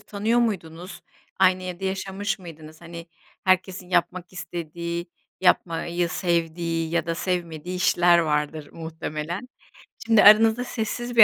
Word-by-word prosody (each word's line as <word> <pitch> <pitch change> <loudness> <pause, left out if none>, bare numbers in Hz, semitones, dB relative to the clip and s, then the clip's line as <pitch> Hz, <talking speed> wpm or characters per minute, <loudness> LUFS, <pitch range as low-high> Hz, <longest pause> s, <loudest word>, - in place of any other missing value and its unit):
tanıyor 215 +4 0
muydunuz? 180 -6 -3 0.4
Aynı 185 -1 +4
evde 180 +1 -6
yaşamış 195 +2 -2
mıydınız? 160 -3 -12
Hani, 170 0 -9 0.4
herkesin 185 -1 +1
yapmak 180 0 0
istediği, 170 0 -5 0.3
yapmayı 170 -1 +1
sevdiği 165 -1 -1
ya 170 0 0
da 165 - -1
sevmediği 175 -1 -3
işler 175 -1 +4
vardır 150 -1 -1
muhtemelen. 160 +5 -5 0.6
Şimdi 225 -2 +5
aranızda 220 +3 +7
sessiz 240 +1 -4
bir 230 - +11
175 Hz, 120 wpm, -24 LUFS, 165-190 Hz, 0.6 s, bir